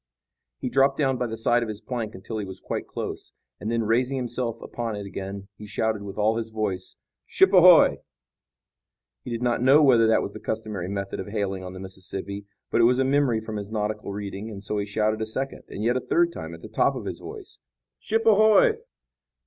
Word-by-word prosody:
He - - -4
dropped 135 +2 +3
down 135 -3 +1
by 125 - 0
the 115 0 -5
side 120 +2 +3
of 115 - -3
his 105 -1 -5
plank 115 -2 -4
until 110 +4 -6
he 105 - -3
was 95 0 -7
quite - - -4
close, - - -5 0.3
and 110 - -3
then, 115 -1 +1
raising 125 +5 +1
himself 120 -2 -2
upon 115 -2 -4
it 100 -1 -6
again, 100 0 -6
he 105 - -9
shouted 110 0 -1
with 100 0 -8
all 110 +2 +2
his 115 -1 -3
voice: 105 -4 -3 0.3
"Ship 190 +1 +4
ahoy!" 180 -2 +7 1.2
He - - -7
did 120 0 -3
not 120 -1 +1
know 135 +4 +6
whether 120 -5 +6
that 110 - +3
was 100 - -5
the - - -8
customary 105 -5 -4
method 100 0 -4
of 95 - -5
hailing 100 -3 -2
on 90 0 -7
the 95 - -8
Mississippi, 95 +1 -6 0.2
but 120 - +3
it - - +6
was 125 +1 +4
a 135 - +2
memory 135 -4 +2
from 110 -1 -5
his 100 0 -6
nautical 105 -1 -2
reading, 100 +1 -5
and 100 -2 -8
so 105 +1 -2
he 100 - -3
shouted 110 +1 0
a - - 0
second 135 +5 -4
and 105 - -5
yet 120 +2 +2
a 130 - 0
third 345 0 +2
time - - -7
at - - -15
the - - -7
top - - +1
of - - -6
his - - -5
voice: 420 -3 -10 0.4
"Ship 225 +1 -1
ahoy!" 220 - +5
110 Hz, 220 wpm, -25 LUFS, 100-125 Hz, 1.2 s, ahoy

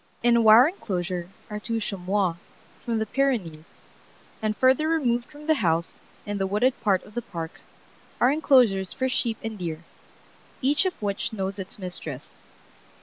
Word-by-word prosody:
In 240 0 +5
a 235 - +4
wire 225 +4 +8
enclosure 180 - -4 0.2
are 210 -1 -5
two 225 +1 -2
chamois 195 -3 -1 0.5
from 230 -1 -1
the 220 - 0
Pyrenees, 215 - -1 0.7
and 215 -1 -1
further 265 +4 +3
removed 245 -7 +1
from 300 0 -13
the 315 - +4
house, 165 -2 0 0.2
in 205 -1 -3
the 195 - 0
wooded 220 +7 +2
part 200 -5 +2
of 210 - -15
the 240 - -2
park, 165 -6 -7 0.6
are 245 - +5
enclosures 245 -11 +3
for 260 - -1
sheep 235 -3 0
and 220 -2 -5
deer, 165 -2 -4 0.8
each 290 +8 +2
of 370 - -5
which 200 -1 -1
knows 195 -1 -3
its 190 0 -6
mistress. 185 -3 -7
215 Hz, 160 wpm, -25 LUFS, 190-250 Hz, 0.8 s, wire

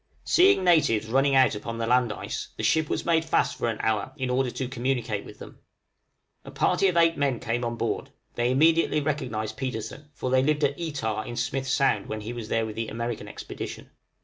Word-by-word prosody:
Seeing 365 - +4
natives 155 -12 +3
running 135 +4 +2
out 130 -3 +5
upon 115 +2 -5
the 115 - -1
land 125 -1 +3
ice, - - -5
the - - -4
ship 160 -1 +2
was - - -2
made 165 -1 +3
fast 160 - +1
for 120 - -1
an 110 - -3
hour 110 +3 -1
in 130 -2 -2
order 130 0 +1
to 130 +1 -4
communicate 120 -4 -2
with - - -12
them. - - -12 0.8
A - - -10
party 195 - +2
of 180 -2 0
eight 165 -1 +4
men 140 -5 0
came 120 +2 -2
on 120 0 -2
board: - - -2 0.2
they 120 0 0
immediately 155 +3 +3
recognized 125 -8 -3
Petersen, 130 +3 -5
for 130 - -3
they 130 0 +4
lived 150 +2 +1
at 140 0 +2
Etah 110 -10 -3
in 120 - -5
Smith's 130 +2 -2
Sound 125 -8 +2
when 110 0 -4
he 110 +3 -5
was 115 -2 -7
there 115 0 0
in 110 - -6
the 115 +1 -3
American 115 -1 -4
expedition. - - -8
125 Hz, 210 wpm, -26 LUFS, 115-145 Hz, 0.8 s, out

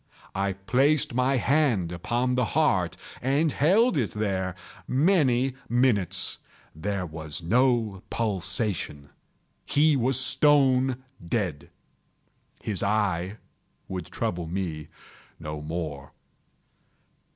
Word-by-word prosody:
I 100 0 -1
placed 130 +10 +1
my 130 +2 +2
hand 125 - +2
upon 120 +9 -1
the 125 0 +2
heart - - +2 0.2
and 140 +5 +2
held 190 - +3
it 115 - 0
there 95 -4 -1 0.3
many 135 -4 +2 0.2
minutes. 120 -7 +1 0.4
There 95 +3 -3
was 80 0 -5
no 115 -1 +2
pulsation. 95 -8 -1 0.5
He 150 +1 +3
was 130 0 +2
stone 135 -2 +3 0.2
dead. 85 -5 -2 0.9
His 105 -5 -3
eye 100 -2 0 0.5
would 90 -3 -5
trouble 85 -1 -3
me 85 -4 -4 0.5
no 75 0 -6
more. 75 -3 -5
110 Hz, 95 wpm, -26 LUFS, 90-130 Hz, 0.9 s, held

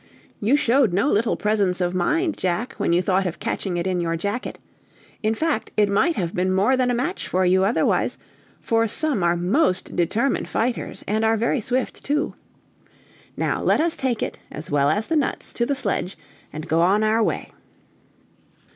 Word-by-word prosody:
You 225 +7 +3
showed 250 -6 +3
no 200 +10 +2
little 220 -1 +1
presence 205 -4 +1
of 180 -1 0
mind, 315 - +1
Jack, 185 +7 -2
when - - +1
you 175 +2 +3
thought 190 +1 +1
of 175 - -5
catching 180 -3 -3
it 170 - -2
in 185 -2 0
your 165 -1 -1
jacket; 205 +8 -3 0.6
in 220 +1 +1
fact, 315 -5 -1
it 210 -1 +4
might 270 +13 +2
have 175 -6 -2
been 185 +1 0
more 200 +8 +3
than 255 -1 +1
a 245 - +1
match 300 +11 -2
for 185 +1 +1
you 185 +1 +3
otherwise, 205 +5 +1 0.4
for 230 0 +1
some 280 -1 0
are 170 0 +2
most 185 - 0
determined 215 +10 0
fighters, 240 +1 -2
and 215 +2 0
are 225 0 +3
very 235 +3 0
swift, 250 +4 -2
too. 300 +3 -1 1.0
Now - - -1
let - - +2
us 330 +1 +1
take 255 -4 -1
it, - - -5
as 150 +1 -8
well 145 -1 +3
as 210 +8 0
the 325 - -1
nuts, 295 -3 -1
to 235 - -1
the 280 - 0
sledge, 200 -7 -2 0.3
and 155 +2 -7
go 160 +1 +2
on 195 +5 +3
our 220 +1 +2
way." - - -1
210 Hz, 190 wpm, -23 LUFS, 180-250 Hz, 1.0 s, it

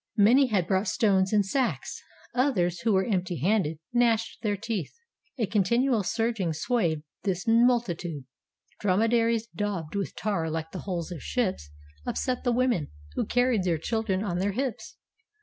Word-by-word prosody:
Many 245 +7 +6
had 200 -7 +1
brought 190 +3 +1
stones 190 -3 +2
in 210 -1 +4
sacks; 250 +6 -2 0.3
others, 185 -10 +1
who 225 +3 +1
were 190 0 +3
empty 185 -5 -1
handed, 170 -1 +1 0.2
gnashed 230 -2 +1
their 210 -3 0
teeth. 210 -4 -3 0.5
A 230 - +1
continual 235 +4 +2
surging 225 -4 -1
swayed 165 -5 0 0.2
this 190 -2 -2
multitude. 225 - +2 0.6
Drome 195 0 +2
daries, 230 -1 +2
daubed 200 -7 -3
with 200 -1 -3
tar 190 -5 -1
like 160 0 -4
the 185 - -5
hulls 175 -2 -3
of 165 -5 -6
ships, 190 - -2 0.3
upset 255 - -2
the 245 - +2
women 240 - +1 0.2
who - - -1
carried 245 -3 +2
their 175 -3 +1
children 205 +2 -1
on 180 -4 -2
their 200 +1 0
hips. 255 0 -4
205 Hz, 155 wpm, -27 LUFS, 180-235 Hz, 0.6 s, Many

